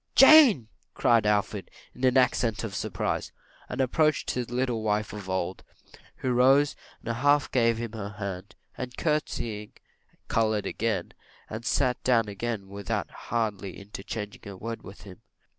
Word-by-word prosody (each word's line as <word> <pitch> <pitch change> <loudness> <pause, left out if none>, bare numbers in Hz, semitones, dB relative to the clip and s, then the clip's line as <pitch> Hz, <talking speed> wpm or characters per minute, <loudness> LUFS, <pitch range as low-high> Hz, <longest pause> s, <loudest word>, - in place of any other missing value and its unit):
"Jane!" 270 - +8 0.3
cried 115 -3 +3
Alfred, 105 -1 0 0.2
in 125 - -11
an 130 +1 +4
accent 120 -4 +2
of 110 -4 -4
surprise; - - -2 0.4
and - - -5
approached 150 +4 +2
his 125 -2 -3
little 120 -2 -1
wife 105 0 -1
of 100 -3 -7
old, 95 0 -2 0.5
who 130 - -1
rose 135 +4 +4 0.3
and 115 0 -2
half 145 +2 +3
gave 115 -3 +3
him 115 -1 -4
her 105 -2 -6
hand, 100 -1 -6 0.2
and 125 0 -6
courtseying, 115 -9 -2 0.5
coloured 110 -2 +1
again, 115 -2 -2 0.4
and 110 +2 -6
sat 130 -3 +1
down 115 -4 +3
again 105 0 -4
without 100 -2 -4
hardly 105 -5 -3
interchanging 105 +1 -7
a 100 -2 -8
word 115 +3 -5
with 95 -1 -12
him. 95 -2 -12
115 Hz, 145 wpm, -27 LUFS, 105-125 Hz, 0.5 s, Jane